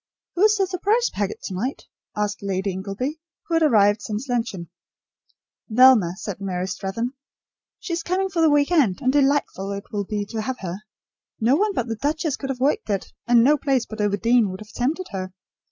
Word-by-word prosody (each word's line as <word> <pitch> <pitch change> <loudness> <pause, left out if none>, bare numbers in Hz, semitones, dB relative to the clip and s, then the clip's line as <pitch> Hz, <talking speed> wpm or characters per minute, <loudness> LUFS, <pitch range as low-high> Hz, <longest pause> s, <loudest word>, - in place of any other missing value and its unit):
"Who 355 - -2
is 430 0 +5
the 390 -2 +2
surprise 410 +6 +1
packet 205 -1 -3
to - - -5
night?" 240 +10 -3 0.3
asked 210 0 -1
Lady 195 0 -1
Ingleby, 200 - -4 0.3
who 335 - -5
had 330 - +3
arrived 210 -8 +4
since 215 +5 -4
luncheon. 225 -9 -3 1.0
"Velma," 225 -6 +6
said 200 -1 -6
Mary 185 -2 -2
Strathern. 195 +6 -3 0.7
"She 370 - -5
is 335 - -1
coming 370 +3 0
for 350 -3 -1
the 320 - +5
week 290 +2 +3
end, 265 - +3
and 260 -1 +1
delightful 275 -9 +1
it 200 +1 -8
will 205 -1 -2
be 205 +1 -3
to 225 -2 -2
have 255 +4 -3
her. 180 -1 -4 0.6
No 235 +5 +3
one 405 +4 +1
but 240 - 0
the 230 -2 -3
duchess 300 +2 -1
could 270 - -6
have 260 -2 -3
worked 270 -3 0
it, 200 -2 -2
and 240 -1 +6
no 295 +4 +5
place 270 -4 +1
but 220 -1 -6
Overdene 210 +2 +2
would 185 +2 -7
have 215 0 -12
tempted 300 +9 -1
her. 185 -1 -5
235 Hz, 200 wpm, -23 LUFS, 200-290 Hz, 1.0 s, Velma